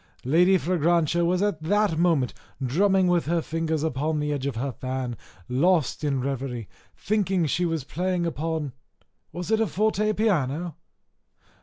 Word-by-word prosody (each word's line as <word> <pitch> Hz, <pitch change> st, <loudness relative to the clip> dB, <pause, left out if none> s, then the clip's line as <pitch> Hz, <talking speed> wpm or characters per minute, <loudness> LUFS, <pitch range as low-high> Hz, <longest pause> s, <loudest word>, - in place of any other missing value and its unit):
Lady 175 Hz, +8 st, +5 dB
Fragrantia 170 Hz, 0 st, +1 dB
was 180 Hz, +3 st, +2 dB
at 205 Hz, -7 st, -1 dB
that 205 Hz, +2 st, +2 dB
moment 160 Hz, -7 st, +2 dB, 0.3 s
drumming 190 Hz, +8 st, +3 dB
with 175 Hz, -3 st, +2 dB
her 170 Hz, +1 st, +2 dB
fingers 160 Hz, -1 st, -2 dB
on 155 Hz, +1 st, -1 dB
the 150 Hz, 0 st, -1 dB
edge 140 Hz, -1 st, -2 dB
of 140 Hz, -, -3 dB
her 135 Hz, +4 st, -2 dB
fan, 130 Hz, -1 st, -4 dB, 0.3 s
lost 155 Hz, +3 st, +1 dB
in 145 Hz, -2 st, +1 dB
a -, -, 0 dB
reverie, 130 Hz, -4 st, -3 dB, 0.3 s
thinking 195 Hz, -4 st, +1 dB
she 170 Hz, +4 st, 0 dB
was 165 Hz, -4 st, -1 dB
playing 180 Hz, +4 st, -1 dB
upon 160 Hz, -3 st, -2 dB, 0.6 s
Was 175 Hz, +5 st, -5 dB
it 220 Hz, -, +3 dB
a 225 Hz, -, +2 dB
forte 215 Hz, +3 st, +1 dB
piano? 170 Hz, -, 0 dB
165 Hz, 155 wpm, -25 LUFS, 140-180 Hz, 0.6 s, Lady